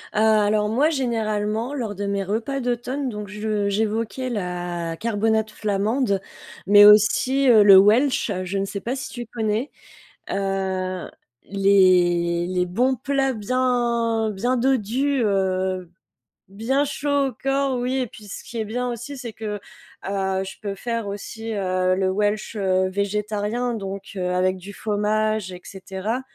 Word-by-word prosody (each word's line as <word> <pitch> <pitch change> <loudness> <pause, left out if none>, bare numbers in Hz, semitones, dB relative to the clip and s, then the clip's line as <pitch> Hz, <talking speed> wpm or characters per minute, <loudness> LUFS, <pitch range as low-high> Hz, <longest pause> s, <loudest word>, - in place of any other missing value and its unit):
Heu, 215 - +2
alors 215 -1 +3
moi, 275 +8 +3
généralement, 225 -2 -1
lors 225 -7 -3
de 205 - -4
mes 200 0 -1
repas 225 +8 -2
d'automne, 250 +2 -2
donc 210 -2 -6
je 210 0 -2
j'évoquais 220 +4 -1
la 175 -5 -3
carbonate 220 0 0
flamande, 210 +1 0 0.5
mais 205 +1 +8
aussi, 250 +6 +5
heu, 220 -3 +7
le 200 -2 +9
Welsch. 230 +4 +3
Je 185 +2 -3
ne 195 - 0
sais 200 +1 -5
pas 250 +3 -3
si 265 - -6
tu 240 -1 -6
connais? 225 +3 -2 0.6
Heu, 190 -2 -2 0.4
les 180 -3 +3
les 180 -1 0
bons 250 +9 +1
plats 270 +1 0
bien 235 -1 0
bien 245 +6 0
dodus, 260 +2 +1
heu, 190 -2 0 0.6
bien 240 +8 0
chauds 285 0 0
au - - -11
corps, 270 -1 0
oui 250 +2 -1
et 250 - -1
puis 210 - -14
ce 200 - -8
qui 235 - -8
est 220 - -1
bien 245 +4 -2
aussi, 240 +4 -7
c'est 240 -3 -6
que, 210 -2 -5 0.5
heu, 190 -1 -1
je 190 - -9
peux 200 -2 -4
faire 230 0 -3
aussi, 220 +3 -6
heu, 185 -2 +1
le 190 0 +1
Welsh, 210 +2 -1
heu, 185 -1 +1
végétarien, 210 +4 -2
donc 195 -2 -6
heu, 180 -1 -1
avec 185 +1 +1
du 195 +3 -10
faumage 215 -1 -1
et 180 - -10
cetera. 195 +5 -4
210 Hz, 155 wpm, -23 LUFS, 195-240 Hz, 0.6 s, le